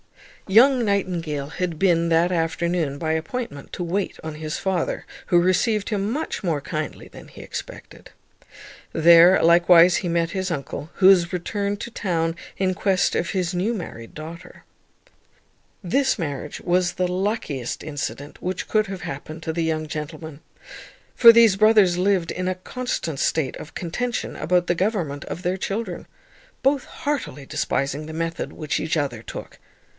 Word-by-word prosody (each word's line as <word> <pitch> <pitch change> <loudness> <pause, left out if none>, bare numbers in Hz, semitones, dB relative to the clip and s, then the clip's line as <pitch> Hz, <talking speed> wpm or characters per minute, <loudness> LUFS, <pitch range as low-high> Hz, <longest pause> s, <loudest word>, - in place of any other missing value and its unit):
Young 245 +5 +5
Nightingale 175 -8 -1
had 170 +1 -3
been 170 -2 +2
that 170 +2 +3
afternoon, 165 -3 -1
by 160 +1 -1
appointment, 160 - -4
to 180 - -3
wait 185 +4 -2
on 160 -1 -5
his 155 0 -4
father, 190 -3 -2 0.2
who 175 - +4
received 200 +4 +1
him 205 -1 -1
much 295 -2 -3
more 165 -5 0
kindly 155 +1 -5
than - - -13
he - - -12
expected. - - -9 0.8
There 170 +3 +7
likewise 175 +1 +6
he 175 - -2
met 170 0 0
his 190 -1 -2
uncle, 150 -1 -5
who 190 - +5
was 175 -3 +5
returned 200 +3 -2
to 235 - -6
town 165 -6 -1 0.2
in 185 -1 +1
quest 190 -1 +1
of 170 - 0
his 185 -2 -1
new 195 +7 0
married 115 - -8
daughter. 165 +3 -10 1.2
This 265 +9 +1
marriage 150 -5 -4
was 180 0 +1
the 180 0 0
luckiest 180 - -2
incident 145 -1 -6
which 185 0 -3
could 215 -1 +1
have 190 -2 -6
happened 155 +4 -7
to 160 - -3
the 165 0 -1
young 155 -1 -1
gentleman; 155 0 -6 0.7
for 235 -2 +9
these 230 -4 +6
brothers 205 -4 +4
lived 185 -3 +1
in 185 0 -3
a 185 - 0
constant 185 - -4
state 150 -5 0
of 155 - -11
contention 230 +8 -3
about 175 +2 +1
the 175 - +1
government 170 -7 -1
of 175 - -6
their 180 +2 0
children, 205 +4 -4 0.6
both 275 0 +2
heartily 285 - -4
despising 140 +3 -2
the 160 - -7
method 165 +1 -3
which 155 -2 -3
each 160 +1 -1
other 135 -7 -2
took. - - -9
175 Hz, 160 wpm, -23 LUFS, 160-195 Hz, 1.2 s, for